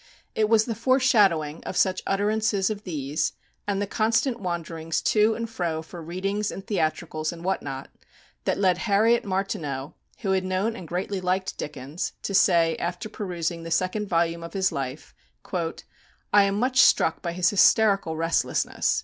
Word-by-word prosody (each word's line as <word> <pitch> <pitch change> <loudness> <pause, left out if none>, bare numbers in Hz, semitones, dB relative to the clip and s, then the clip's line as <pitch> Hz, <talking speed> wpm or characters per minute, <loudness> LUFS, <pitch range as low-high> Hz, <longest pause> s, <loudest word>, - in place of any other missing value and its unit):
It 215 -1 +1
was 220 -1 +4
the 230 - -2
foreshadowing 210 - +2
of 180 - -5
such 185 0 +2
utterances 205 0 +1
as 210 -1 -5
these, 150 -6 -2 0.3
and 200 -1 0
the 205 - 0
constant 230 +4 +1
wanderings 165 -3 -3
to 215 +1 +3
and 230 0 -3
fro 170 -7 -3
for 170 +2 -10
readings 195 +5 -2
and 195 - -7
theatricals 155 -4 -1
and 170 -1 -10
what 190 0 0
not, 135 -1 -6 0.5
that - - +1
led 185 -2 +2
Harriet 220 +3 +3
Martineau, 160 -8 -3 0.3
who 195 -4 0
had 190 -1 +2
known 185 +5 -1
and 180 -7 -9
greatly 185 +3 -3
liked 185 +1 -1
Dickens, 145 +2 -5
to 200 - -3
say 170 -4 +4
after 180 +5 -4
perusing 175 -5 -3
the 165 - -7
second 185 +5 0
volume 170 -1 +1
of 170 0 -8
his 190 -1 +1
life, 135 -1 -5 0.4
"I 180 +3 -1
am 195 0 0
much 255 +4 +1
struck 160 - +4
by 170 - -3
his 180 +1 +2
hysterical 200 -4 +4
restlessness. 165 +1 0
185 Hz, 165 wpm, -25 LUFS, 165-205 Hz, 0.5 s, was